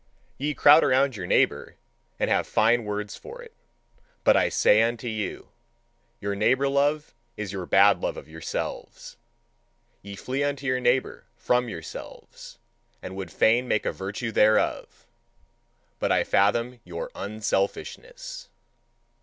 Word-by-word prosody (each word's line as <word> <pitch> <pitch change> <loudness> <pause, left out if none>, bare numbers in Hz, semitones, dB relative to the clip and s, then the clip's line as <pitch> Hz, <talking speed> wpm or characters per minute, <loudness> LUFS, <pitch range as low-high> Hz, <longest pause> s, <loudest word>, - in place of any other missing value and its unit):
Ye 145 +2 -2
crowd 150 +2 +7
around 135 0 +2
your 90 -4 -6
neighbour, - - +1 0.4
and - - +1
have - - +1
fine 115 +1 +2
words 105 0 -4
for 465 +2 -11
it. 470 -1 -15 0.7
But - - +5
I - - +3
say 105 - +4
unto 120 +1 -1
you: 110 -3 -5 0.7
your 100 0 -3
neighbour 130 +7 +2
love 145 +2 0 0.2
is 105 -2 -5
your 95 -3 -5
bad 100 0 +5
love - - -2
of - - -10
yourselves. 80 +1 -6 0.8
Ye 100 0 -9
flee 130 +7 -3
unto 140 -1 -3
your 130 -1 +1
neighbour 125 +1 0
from 125 -1 0
yourselves, 80 -6 -10 0.4
and 95 - -8
would 95 -4 -6
fain 120 +3 +2
make 110 - 0
a - - 0
virtue 105 +4 -5
thereof: 110 0 +1 0.9
but - - 0
I - - +3
fathom 115 +5 +1
your 85 -1 -7
"unselfishness." 480 - -4
115 Hz, 135 wpm, -25 LUFS, 100-135 Hz, 0.9 s, crowd